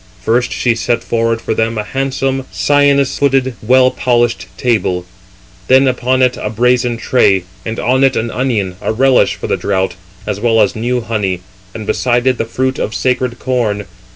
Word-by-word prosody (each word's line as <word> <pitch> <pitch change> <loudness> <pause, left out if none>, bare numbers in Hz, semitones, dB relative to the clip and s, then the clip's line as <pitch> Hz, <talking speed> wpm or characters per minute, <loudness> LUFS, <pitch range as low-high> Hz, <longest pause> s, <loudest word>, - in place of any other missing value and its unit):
First 115 +5 0
she 120 - +1
set 115 +1 -1
forward 115 -1 0
for - - -2
them 115 +1 -1
a 105 - -1
handsome, 135 +2 -2
cyanus 145 -2 +2
footed, 135 -2 +2
well 130 +3 +4
polished 120 -1 0
table; 100 -7 0 0.6
then 130 +1 +5
upon 130 0 +1
it 125 0 +2
a 105 - -2
brazen 120 +1 +1
tray, 100 -5 +2 0.2
and 110 +1 -4
on 130 +2 +2
it 135 -1 +3
an 115 +1 -2
onion, 105 -8 -1
a - - -1
relish 130 +3 +3
381 - - -13
for - - -5
the - - 0
draught, 95 -3 -1 0.3
as 105 -1 -3
well 115 0 +2
as 105 -2 +2
new 120 +2 -1
honey, 105 -5 -2 0.3
and 110 - -6
beside 120 +2 0
it 130 -1 +2
the - - 0
fruit 130 +3 -2
of 110 - -3
sacred 125 +1 -1
corn. 115 -6 -1
120 Hz, 180 wpm, -15 LUFS, 110-130 Hz, 0.6 s, then